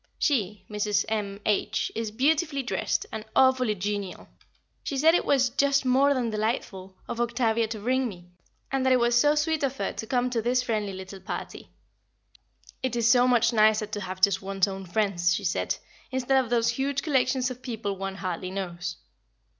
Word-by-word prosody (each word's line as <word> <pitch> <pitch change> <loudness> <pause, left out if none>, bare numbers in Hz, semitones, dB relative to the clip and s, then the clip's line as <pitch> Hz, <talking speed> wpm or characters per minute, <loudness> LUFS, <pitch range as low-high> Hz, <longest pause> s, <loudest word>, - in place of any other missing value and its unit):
She 210 - 0
Mrs. 210 -1 0
M. 205 -2 -2
H. 210 -2 0
is 225 -1 -3
beautifully 280 +5 +1
dressed, 255 - -1
and 220 - -5
awfully 255 -4 +4
genial; 200 -1 -4 0.5
she 275 - -3
said 320 +4 +5
it 350 - +2
was 260 -3 +3
"just 280 +1 +2
more 275 +3 +4
than 240 -3 -1
delightful" 210 -4 -3
of 235 - -3
Octavia 235 -1 +1
to 220 0 -5
bring 255 +4 0
me, 175 -4 -11 0.5
and 270 -1 0
that 260 0 +4
it 255 - +4
was 240 0 +2
so 290 +5 +4
sweet 315 +1 0
of 275 -1 -1
her - - -2
to 220 - -6
come 250 0 0
to 235 -2 0
this 250 +2 +1
friendly 215 -5 -2
little 190 +1 -8
party. - - -7 1.1
"It 260 -2 -2
is 230 -1 +3
so 250 0 +5
much 235 -1 +3
nicer 215 0 +4
to 210 0 -5
have 185 0 -6
just 190 -1 +4
one's 195 0 0
own 195 -1 -6
friends," 175 -3 +1
she - - -4
said, - - 0 0.3
"instead 260 0 +2
of 240 - -9
those 235 -1 +2
huge 280 +1 -1
collections 260 -3 +1
of 250 0 -9
people 220 -5 -4
one 195 0 -5
hardly 185 -1 -4
knows." 180 -2 -4
230 Hz, 185 wpm, -26 LUFS, 200-260 Hz, 1.1 s, said